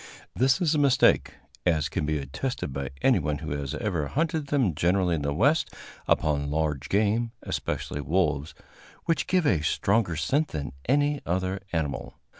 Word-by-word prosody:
This 130 Hz, +1 st, +3 dB
is 165 Hz, -3 st, +2 dB
a 150 Hz, -, +2 dB
mistake, 140 Hz, -2 st, +4 dB, 0.3 s
as 80 Hz, -4 st, +2 dB
can 80 Hz, -1 st, -2 dB
be 75 Hz, 0 st, +1 dB
attested 70 Hz, -, -4 dB
by 70 Hz, -1 st, -3 dB
anyone 75 Hz, -1 st, +2 dB
who 75 Hz, -1 st, -6 dB
has 70 Hz, -2 st, -3 dB
ever 85 Hz, -9 st, -1 dB
hunted 155 Hz, -, -1 dB
them 130 Hz, -, +2 dB
generally 90 Hz, +3 st, +2 dB
in 80 Hz, -, -1 dB
the 70 Hz, 0 st, -1 dB
West 140 Hz, -, +2 dB, 0.4 s
upon 70 Hz, -2 st, +1 dB
large 75 Hz, -2 st, -1 dB
game, 110 Hz, +3 st, +1 dB
especially 70 Hz, -, -3 dB
wolves, 75 Hz, -3 st, 0 dB, 0.5 s
which 160 Hz, -3 st, 0 dB
give 180 Hz, -3 st, +2 dB
a 85 Hz, -, +3 dB
stronger 95 Hz, +4 st, +1 dB
scent 135 Hz, -, +1 dB
than 75 Hz, -3 st, -5 dB, 0.2 s
any 145 Hz, +1 st, +2 dB
other 95 Hz, +2 st, -1 dB
animal. 80 Hz, -4 st, -3 dB
90 Hz, 160 wpm, -27 LUFS, -, 0.5 s, mistake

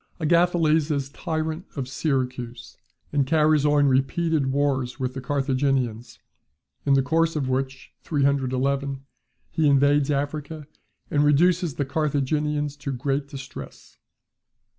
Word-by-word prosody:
Agathocles 165 Hz, -1 st, +3 dB
is 140 Hz, -3 st, -1 dB
tyrant 160 Hz, +3 st, -3 dB
of 135 Hz, -3 st, -3 dB
Syracuse; 125 Hz, -4 st, -3 dB, 0.4 s
and 140 Hz, -2 st, +2 dB
carries 155 Hz, -1 st, +3 dB
on 145 Hz, -1 st, +4 dB
repeated 140 Hz, +2 st, +1 dB
wars 135 Hz, -2 st, 0 dB
with 130 Hz, -1 st, -2 dB
the 135 Hz, -, -5 dB
Carthaginians; 130 Hz, -3 st, -1 dB, 0.7 s
in 140 Hz, -, +5 dB
the 135 Hz, -, +3 dB
course 165 Hz, +3 st, +1 dB
of 140 Hz, -4 st, -1 dB
which 130 Hz, 0 st, -3 dB
(311) 140 Hz, -1 st, 0 dB, 0.5 s
he 160 Hz, -2 st, +2 dB
invades 140 Hz, 0 st, +4 dB
Africa, 145 Hz, +2 st, -3 dB, 0.5 s
and 145 Hz, 0 st, +3 dB
reduces 170 Hz, +2 st, +3 dB
the 140 Hz, -, -1 dB
Carthaginians 150 Hz, 0 st, -1 dB
to 140 Hz, -1 st, -4 dB
great 135 Hz, +2 st, -2 dB
distress. 135 Hz, -2 st, -10 dB
140 Hz, 120 wpm, -24 LUFS, 135-150 Hz, 0.7 s, in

